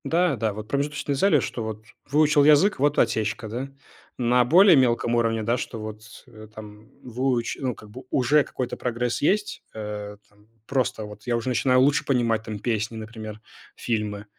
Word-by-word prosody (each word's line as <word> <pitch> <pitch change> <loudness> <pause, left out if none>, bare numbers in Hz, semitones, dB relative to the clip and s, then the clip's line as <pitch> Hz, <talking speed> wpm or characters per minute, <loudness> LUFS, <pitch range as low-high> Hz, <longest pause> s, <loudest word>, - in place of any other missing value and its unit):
Да, 175 -2 +1
да, 110 -2 -1
вот 105 +1 -8
промежуточные 145 +1 -2
цели, 155 +1 +3
что 120 -2 -4
вот 110 0 -6 0.3
выучил 150 0 +4
язык- 155 +7 +5
вот 145 +1 +2
и - - +6
отсечка, 110 +2 -1
да. 120 +5 -4 0.5
На 125 0 +3
более 180 - +7
мелком 120 -2 +2
уровне, 115 -1 +1
да, 120 +3 +1
что 115 -2 -6
вот, 110 0 -7 0.3
э, 110 -1 -13
там 105 +1 -12
выуч 125 -1 -1
ну, 130 -3 -2
как 105 - -14
бы 130 +4 -10
уже 140 +3 +3
какой-то 125 -2 -5
прогресс 120 0 -2
есть, 205 +7 0
э-э, 105 -1 -6
там 105 +1 -27 0.2
просто 130 -5 -1
вот 105 +3 -12
я 120 - +1
уже 115 +2 -3
начинаю 130 0 +3
лучше 140 +2 +3
понимать 115 -4 +1
там 110 -2 -6
песни, 110 0 -2
например, 110 -1 -8 0.4
фильмы. 105 -3 -3
120 Hz, 180 wpm, -24 LUFS, 110-135 Hz, 0.5 s, более